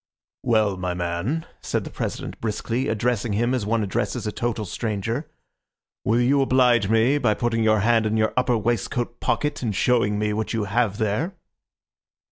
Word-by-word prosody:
"Well, 110 -4 +2
my 90 -1 -2
man," 90 - -2 0.2
said - - -1
the - - -8
President - - -5
briskly, 115 +3 -2
addressing 115 0 0
him 120 +5 +1
as 120 -6 -1
one 115 0 +1
addresses 95 - -2
a 105 - -1
total 115 -1 -2
stranger, 115 - -3 0.7
"will 115 +3 +2
you 135 +3 +3
oblige 125 -6 +3
me 115 +6 +3
by 115 -6 +2
putting 115 -1 0
your 110 -1 +3
hand 115 0 +3
in 110 +1 0
your 110 0 +1
upper 125 -2 +2
waistcoat 120 +2 -2
pocket 150 0 -1
and 110 -5 -2
showing 110 -4 +2
me 105 0 0
what 110 +2 -2
you 110 -2 0
have 105 0 0
there?" 115 - -1
115 Hz, 170 wpm, -24 LUFS, 105-125 Hz, 0.7 s, you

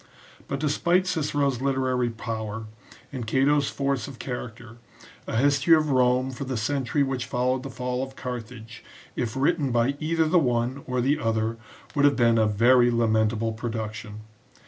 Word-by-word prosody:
But 140 - -3
despite 170 +5 +1
Cicero's 145 -7 0
literary 130 -2 0
power, 110 -1 -5 0.5
and 125 -4 -5
Cato's 140 +4 +2
force 140 -4 -2
of 135 -3 -10
character, 120 -2 -7 0.5
a - - -2
history 140 +5 +4
of 155 -2 +1
Rome 130 0 +2
for 130 +2 -6
the 130 -2 -3
century 135 +4 0
which 135 -2 -3
followed 125 +1 0
the 135 - -7
fall 125 +1 -3
of 135 0 -6
Carthage, 120 -1 -7 0.3
if 120 -3 -2
written 145 +1 +1
by 120 +3 +2
either 160 +1 +1
the 175 +3 +4
one 125 -1 0
or 125 -1 0
the 140 +5 +1
other, 115 -2 -1 0.4
would 145 -1 +3
have 145 - +4
been 115 -2 +3
a 110 - +3
very 120 +4 +4
lamentable 110 -1 +1
production. 110 -2 -5
125 Hz, 160 wpm, -25 LUFS, 115-140 Hz, 0.5 s, history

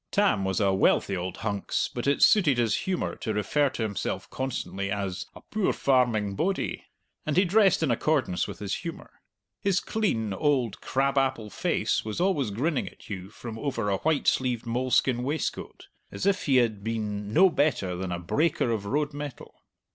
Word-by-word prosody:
Tam 200 - +2
was 95 0 0
a 100 -2 +3
wealthy 95 0 +2
old 90 0 -4
hunks, 100 -2 -1
but 120 +2 -3
it 140 - +3
suited 155 - +5
his 115 -3 +2
humour 185 +6 -2
to 110 -3 -3
refer 140 +7 +2
to 125 - -4
himself 105 -2 -3
constantly 105 -7 -3
as 95 -2 -3
"a - - -11
poor 215 -3 0
farming 120 -7 +2
bodie." 190 - -1 0.4
And 155 +1 -1
he 190 - +5
dressed 195 -2 +4
in 145 - +2
accordance 130 - +1
with - - -7
his 100 -2 -3
humour. 170 -2 -7 0.5
His 195 -3 +2
clean 115 - -1
old 130 -1 0
crab 135 +1 +1
apple 130 -6 -1
face - - 0
was 110 +5 -4
always 175 - +1
grinning 135 +9 -1
at - - -15
you 95 -1 -5
from 115 +1 -8
over 115 -7 -1
a 95 - +1
white 155 +3 0
sleeved 125 -3 +1
moleskin 125 +1 +1
waistcoat, 145 +5 -3 0.2
as - - -4
if 200 -3 +1
he 135 - +4
had 110 -5 +2
been 105 -2 -3
no 185 - +6
better 120 - +1
than 90 0 -4
a 90 - -1
breaker 140 - 0
of 105 -3 -2
road 145 +5 0
metal. 145 -2 -7
125 Hz, 180 wpm, -27 LUFS, 105-150 Hz, 0.5 s, no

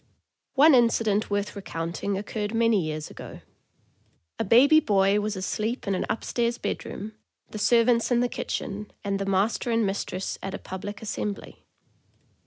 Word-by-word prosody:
One 295 +3 +7
incident 230 -4 +3
worth 205 +1 -2
recounting 185 +1 -3
occurred 210 +2 -4
many 230 -3 +3
years 155 -1 -4
ago. - - -10 1.0
A - - +1
baby 265 +9 +6
boy 200 -7 +3
was 210 0 -2
asleep 215 +5 -3
in 195 - +1
an 185 - -2
upstairs 235 +2 -1
bedroom, 210 +2 -5 0.4
the 215 - -6
serv 230 +2 +4
ants 235 -2 +3
in 245 -1 +3
the 245 - +2
kitchen, 210 -3 -4
and 200 -1 -1
the 195 - -3
master 195 +5 +1
and 230 -1 +2
mistress 195 -1 -3
at 195 0 -4
a - - -4
pub 190 0 -8
lic 205 +1 -6
assembly. 205 -1 -5
210 Hz, 160 wpm, -26 LUFS, 195-230 Hz, 1.0 s, One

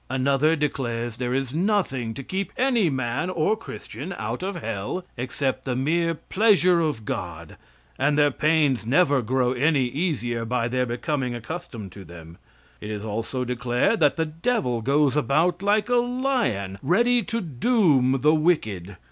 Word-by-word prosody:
Another 135 +4 +2
declares 120 -6 -2
there 125 0 -2
is 135 -1 -2
nothing 160 - 0
to 135 - -6
keep 190 +7 -3
any 245 -8 +2
man 130 +4 -2
or 185 +3 +1
Christian 155 - -8
out 110 +3 -4
of 195 +1 -3
hell 115 - -4
except 130 +1 -2
the 130 -2 -2
mere 165 +5 +1
pleasure 185 -1 +3
of 150 -10 -1
God, 85 -4 -5 0.4
and 145 0 +2
their 145 -1 +4
pains 150 -4 +2
never 140 +3 +3
grow 125 +2 +1
any 140 +2 +2
easier 120 -5 -2
by 115 0 -1
their 125 +1 0
becoming 125 +1 -2
accustomed 115 - -7
to 100 +1 -11
them. 85 -1 -13 0.4
It 105 - -6
is 105 0 -5
also 115 +4 -3
declared 125 - 0
that 145 -3 +4
the 160 - +1
devil 160 - -1
goes 140 +3 +2
about 160 +5 +1
like 205 +1 +2
a 245 0 +2
lion, 240 - -1
ready 235 - +3
to 230 - -2
doom 150 - +2
the 150 +1 +5
wicked. 110 - 0
135 Hz, 155 wpm, -24 LUFS, 120-175 Hz, 0.4 s, the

